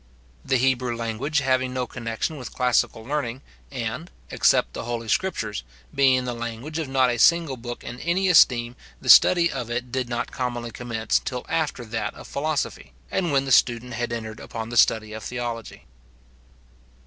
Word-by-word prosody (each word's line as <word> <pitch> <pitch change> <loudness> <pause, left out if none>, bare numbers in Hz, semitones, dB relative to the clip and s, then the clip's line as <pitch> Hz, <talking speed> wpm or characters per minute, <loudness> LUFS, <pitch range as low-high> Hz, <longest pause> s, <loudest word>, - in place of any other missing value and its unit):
The 130 - +1
Hebrew 125 -1 +1
language 120 +6 -1
having 130 -1 0
no 125 -1 -1
connection 115 +5 -4
with 125 - -7
classical 125 -3 +1
learning, 135 -2 -3 0.3
and, 130 +6 -4 0.2
except - - +3
the - - -5
Holy 115 -1 -4
Scriptures, 110 - -1 0.3
being 130 -2 +3
the 125 - -2
language 120 +7 -5
of 160 - -3
not 130 -2 +3
a 120 - -3
single 165 -1 +4
book 120 0 -7
in 120 +1 -7
any 180 +5 0
esteem 125 -9 +5 0.2
the - - -6
study 175 -1 +7
of 125 -5 -4
it 120 +1 -3
did 130 -1 -2
not 120 +1 -3
commonly 120 -2 -3
commence 115 -1 -1
till 125 -1 -4
after 150 -6 -1
that 115 0 -3
of - - -11
philosophy, 150 - -3 0.2
and 175 -4 0
when 135 -1 +2
the 135 - -3
student 120 0 +3
had 120 +1 -3
entered 110 -2 -5
upon 115 -1 -6
the 120 - -5
study 110 -1 +3
of 110 - -6
theology. 120 -2 -5
125 Hz, 170 wpm, -24 LUFS, 115-135 Hz, 0.3 s, study